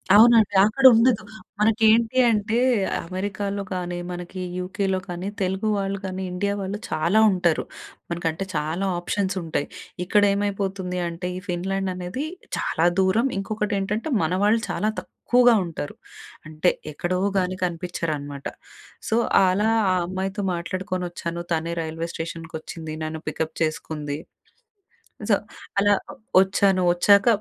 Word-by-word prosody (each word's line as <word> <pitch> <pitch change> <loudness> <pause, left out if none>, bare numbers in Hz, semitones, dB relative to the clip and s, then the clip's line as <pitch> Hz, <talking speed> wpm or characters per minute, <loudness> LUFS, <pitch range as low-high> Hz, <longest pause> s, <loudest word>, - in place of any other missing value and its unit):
అవునండి. 220 -2 +7
అక్కడ 265 +6 0
ఉండదు. 230 -1 +4 0.4
మనకి 225 +1 +2
ఏంటి 230 +2 +2
అంటే 220 +1 +1 0.5
అమెరికాలో 200 +2 -3
కానీ, 180 -1 -3
మనకి 180 +1 -6 0.2
యూకేలో 190 +1 -1
కానీ, 180 +1 -5
తెలుగు 190 +3 0
వాళ్ళు 195 0 -1
కానీ, 190 0 -4
ఇండియా 200 +3 -1
వాళ్ళు 195 +2 -3
చాలా 170 +7 +2
ఉంటారు. 175 -3 +1 0.5
మనకంటే 170 +1 -2
చాలా 155 +6 -1
ఆప్షన్స్ 195 +2 -1
ఉంటాయి. 155 -3 -2 0.4
ఇక్కడ 205 +3 +3
ఏమైపోతుంది 195 -2 -2
అంటే, 170 +2 -5
ఈ - - -4
ఫిన్లాండ్ 190 +2 -1
అనేది 180 +11 -4 0.3
చాలా 165 - 0 0.2
దూరం. 200 +7 +3
ఇంకొకటి 210 +1 -2
ఏంటంటే 210 +9 -2
మన 160 - 0
వాళ్ళు 220 +2 +3
చాలా 215 - 0
తక్కువగా 245 -1 +3
ఉంటారు. 160 -3 -6 0.5
అంటే 155 +3 +2 0.2
ఎక్కడో 180 +4 -1 0.2
గాని 185 0 -1
కనిపిచ్చరన్నమాట. 155 -5 -4 0.6
సో, 220 - +2 0.3
అలా 195 +4 +2 0.2
ఆ - - +2
అమ్మాయితో 190 +2 -3
మాట్లాడుకొని 185 +2 -3
వచ్చాను. 170 0 -4
తనే 165 +1 -1
రైల్వే 165 +1 -4
స్టేషన్‍కొచ్చింది. 160 -1 -6
నన్ను 155 0 -5
పికప్ 160 +1 -3
చేసుకుంది. 150 -2 -3 1.1
సో, - - +6 0.4
అలా 205 +1 +4 0.5
వచ్చాను. 190 0 +3
వచ్చాక 200 +3 +5
185 Hz, 125 wpm, -24 LUFS, 170-205 Hz, 1.1 s, అవునండి